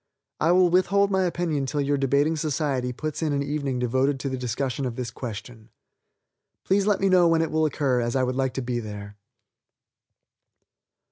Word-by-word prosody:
I 165 - +3
will 180 -1 +4
withhold 195 +2 +3
my 190 -1 +2
opinion 165 -6 -1
till 145 - -2
your 145 0 +1
debating 140 +3 +2
society 145 -5 -1
puts 155 +6 -5
in 155 -2 0
an 140 0 0
evening 140 -2 -2
devoted 130 +3 0
to 140 - -2
the 130 - -2
discussion 130 +3 -2
of 120 - -5
this 120 -2 -4
question. 115 -1 -8 0.9
Please 195 +1 +1
let 205 -2 +2
me 195 - +3
know 180 -2 +5
when 165 -1 +3
it 160 - -3
will 160 0 +2
occur, 135 -4 0
as 120 +1 -2
I 130 - +2
would 125 0 -1
like 130 -1 -1
to 135 - -2
be 120 -1 -2
there. 105 -2 -8
140 Hz, 190 wpm, -25 LUFS, 125-160 Hz, 0.9 s, know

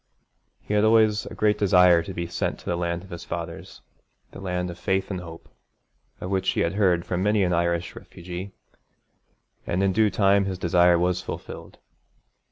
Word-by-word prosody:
He - - -4
had 105 0 +3
always 110 -1 +3
a - - -9
great 105 -1 +1
desire 90 -3 +5
to 95 - -7
be 85 -2 -4
sent 85 - -3
to - - -18
the 85 - -1
land 85 0 -3
of 95 - -15
his 85 - -7
fathers, 85 -1 -7 0.5
the - - -11
land 90 -2 -3
of 85 - -12
faith 95 +1 -1
and 90 -2 -4
hope, 85 -1 -11 0.7
of 90 - -6
which 95 -1 0
he - - 0
had 85 - 0
heard 90 -4 +2
from 90 0 -2
many 105 0 +2
an 90 -1 +1
Irish 85 0 -1
refugee, 90 +3 -8 1.2
and 90 +3 0
in 95 -1 +2
due 110 +2 +3
time 100 -1 +3
his 95 -1 -3
desire 90 0 +3
was 90 +1 0
fulfilled. - - -8
90 Hz, 185 wpm, -24 LUFS, 85-100 Hz, 1.2 s, desire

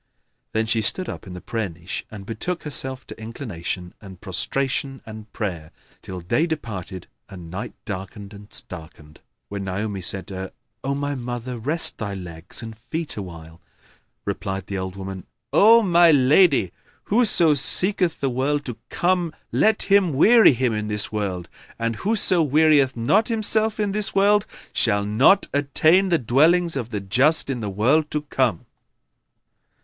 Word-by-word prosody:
Then 110 0 +1
she 110 0 +1
stood 185 - +2
up - - -7
in 90 - -8
the 90 - -8
prayer 110 +1 -3
niche 85 +2 -7
and 100 -2 -10
betook 140 - -4
herself 130 -3 -3
to - - -11
inclination 95 -7 -6
and 95 -4 -12
prostration 135 - -2
and 110 -1 -11
prayer, 85 -8 -5 0.3
till 90 -1 -7
day 155 - 0
departed 100 - -6 0.2
and 85 -4 -10
night 95 +3 -6
darkened 100 0 -7
and 105 0 -13
starkened, 80 -3 -8 0.3
when 100 -1 -6
Naomi 100 +1 -3
said 95 +2 +1
to 100 - -9
her, 95 0 -6 0.3
"O 140 +1 -1
my 145 0 -2
mother, 125 -1 -5
rest 150 +8 +1
thy 100 -3 -4
legs 90 +2 -6
and 110 -1 -8
feet 155 +8 -5
awhile." 85 -4 -9 0.6
Replied 95 -1 -4
the 100 - -6
old 95 0 -5
woman 95 -1 -8 0.3
"O 225 +3 +6
my 175 -3 +5
lady, 140 - +4 0.3
whoso 200 -8 +4
seeketh 180 +5 +1
the 140 - +1
world 145 +4 -1
to 125 -4 -6
come 175 -2 0 0.2
let 220 -1 +2
him 195 -5 +3
weary 220 - +6
him 125 -1 0
in 105 0 -3
this 105 -1 -2
world, 95 -5 -3 0.3
and 115 -1 -2
whoso 195 -4 +3
wearieth 150 -2 +3
not 195 - +2
himself 220 -1 0
in 205 -2 0
this 210 0 0
world 205 +1 +3 0.3
shall 100 0 +2
not 125 - +4
attain 155 +7 +3
the 170 - +3
dwellings 160 +7 +3
of 120 -4 -4
the 105 -4 -4
just 135 +10 +2
in 125 - -3
the 105 -3 -4
world 130 +11 +1
to 150 -1 -3
come." 130 - -1
120 Hz, 160 wpm, -22 LUFS, 100-160 Hz, 0.6 s, O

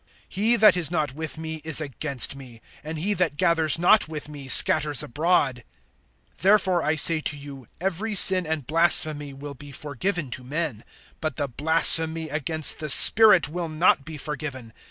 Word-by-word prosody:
(30)He 225 +4 0
that 210 -4 +4
is 170 -5 -2
not 155 -6 -3
with 160 +2 -8
me 160 0 -7
is 160 -1 +2
against 140 -2 -1
me; 125 -4 -15 0.2
and 155 +1 -8
he 195 +7 -3
that 170 -7 -3
gathers 165 -3 0
not 180 +4 +2
with 155 -2 -9
me 145 -3 -12
scatters 145 +1 +3
abroad. 145 -4 -2 0.7
(31)Therefore 190 -3 0
I 155 +1 -1
say 160 +1 +3
to 150 - -5
you, 140 -4 -13
every 195 +4 -4
sin 185 -2 +4
and 155 -4 -5
blasphemy 155 -2 0
will 140 +1 -11
be 145 +1 -14
forgiven 150 +2 -5
to 125 - -6
men; 140 -4 -6 0.4
but 155 -4 -5
the 145 - -4
blasphemy 160 +3 +2
against 155 +1 -1
the 155 -1 -6
Spirit 210 +3 +7
will 170 +2 -7
not 155 -2 0
be 155 +1 -10
forgiven. 135 -5 -8
155 Hz, 170 wpm, -22 LUFS, 145-170 Hz, 0.7 s, Spirit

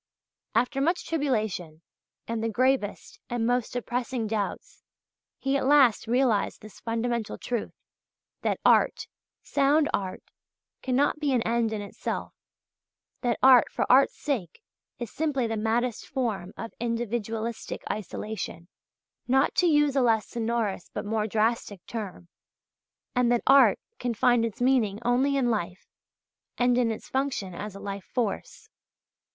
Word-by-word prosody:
After 250 +4 +1
much 340 +5 +1
tribulation, 215 - -2 0.4
and 230 -1 -2
the 225 - 0
gravest 255 -2 0
and 240 -2 -1
most 245 0 +1
depressing 245 0 -2
doubts, 210 -2 -4 0.6
he 270 0 -1
at 275 - +1
last 270 -6 +5
realized 240 -3 +1
this 215 - -12
fundamental 230 0 -2
truth, 240 -3 -4 0.7
that - - 0
art, - - +4 0.4
sound 290 +2 +2
art, 190 -2 -2 0.6
cannot 270 +4 +1
be 295 -2 0
an 240 -3 +2
end 230 -1 +1
in 210 -2 -3
itself, 200 - -5 0.9
that 240 -2 0
art 260 -2 +7
for - - 0
art's 270 +2 +5
sake 275 - -3 0.3
is 240 -3 -6
simply 285 -5 0
the 225 0 -2
maddest 225 +2 -1
form 215 -9 -2
of 225 - -6
individualistic 230 -1 -3
isolation 210 -4 -5 0.6
not 265 +2 +3
to 360 - +3
use 295 -3 +3
a 270 - +4
less 225 -3 +2
sonorous 225 -5 -2
but - - -5
more 215 0 0
drastic 220 -2 -1
term 205 -6 -6 0.9
and 245 -1 +3
that 240 - +2
art 275 0 +6 0.2
can 240 -2 -2
find 240 +1 +3
its 225 - -5
meaning 240 -6 +2
only 265 +3 +2
in 245 -3 +2
life, 185 -3 -3 0.7
and 245 0 +3
in 240 -2 +2
its 220 - -5
function 265 -9 -2
as 205 +3 -6
a - - -8
life 200 -1 -6
force. 230 -6 -3
235 Hz, 140 wpm, -27 LUFS, 215-260 Hz, 0.9 s, art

